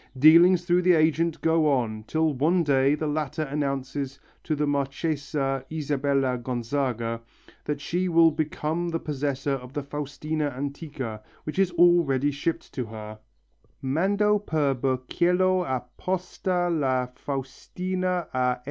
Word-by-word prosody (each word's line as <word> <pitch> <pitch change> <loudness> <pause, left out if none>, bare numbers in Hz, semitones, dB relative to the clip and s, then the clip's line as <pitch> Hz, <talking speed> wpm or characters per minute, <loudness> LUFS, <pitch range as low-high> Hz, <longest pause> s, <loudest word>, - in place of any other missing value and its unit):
Dealings 170 +5 +7
through 175 0 +3
the 180 0 +5
agent 160 +1 +2
go 160 -2 +3
on, 115 -5 0
till 160 -1 +1
one 165 +7 +2
day 140 -1 +3
the 155 - -3
latter 150 0 -2
announces 140 -1 -3 0.2
to 155 - -1
the 150 0 0
Marchesa 140 -1 -1
Isabella 140 -4 0
Gonzaga 120 -1 -2 0.4
that 150 -1 -2
she 175 +5 -1
has 165 -1 +5
become 155 +2 -2
the 165 0 -2
possessor 140 -2 -2
of 125 -1 -6
the 145 - -3
Faustina 145 +1 -3
antica, 140 -5 -5 0.2
which 155 +5 -4
is 195 -2 +4
already 165 -6 +4
shipped 160 +4 -3
to 125 - -3
her 110 -1 -9 0.6
(_Mando 200 +9 +2
per 150 -7 +1
burchiello 175 +9 +1
a 130 -2 -1
posta 180 -1 -1
la 135 -7 +1
Faustina 180 +8 -3
a 125 -1 +2
S. - - -22
145 Hz, 135 wpm, -26 LUFS, 135-165 Hz, 0.6 s, Dealings